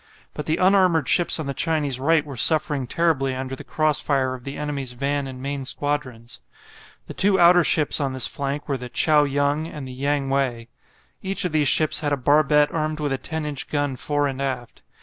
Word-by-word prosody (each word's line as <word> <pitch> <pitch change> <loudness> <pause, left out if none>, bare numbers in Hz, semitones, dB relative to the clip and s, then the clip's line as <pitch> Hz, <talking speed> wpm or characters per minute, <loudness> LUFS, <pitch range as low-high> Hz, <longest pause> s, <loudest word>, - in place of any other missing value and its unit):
But 150 - -7
the 160 +1 0
unarmoured 185 -6 +3
ships 175 -1 +3
on 155 - -4
the 140 - -4
Chinese 145 -4 -1
right 155 +2 +2
were 140 -2 -8
suffering 145 +1 +3
terribly 135 -4 0
under 130 0 -5
the - - -10
cross 155 -2 0
fire 135 -3 0
of 125 -2 -10
the 140 - -6
enemy's 140 -4 -4
van 140 +2 -2
and 130 -1 -9
main 140 0 -4
squadrons. 130 -4 -3 0.6
The - - -9
two 195 0 +2
outer 175 0 +6
ships 150 -2 +2
on 135 -2 -2
this 130 -2 +2
flank 140 +1 -3
were 140 -2 -2
the 125 -1 -8
"Chao 150 +3 +3
Yung" 145 +2 -1
and 150 -5 -8
the 130 - -9
"Yang 140 +1 -2
wei." 125 -4 -2 0.5
Each 195 -1 -3
of 180 - -2
these 150 -2 +2
ships 155 +2 +4
had 145 -2 -2
a - - 0
barbette 150 +2 +3
armed 155 -1 -3
with 145 -2 -2
a 135 - -3
10 160 -1 -5
inch 145 -3 -3
gun 145 -2 -2
fore 145 +3 -1
and 135 -1 -5
aft. 130 -3 -5
145 Hz, 210 wpm, -22 LUFS, 135-155 Hz, 0.6 s, outer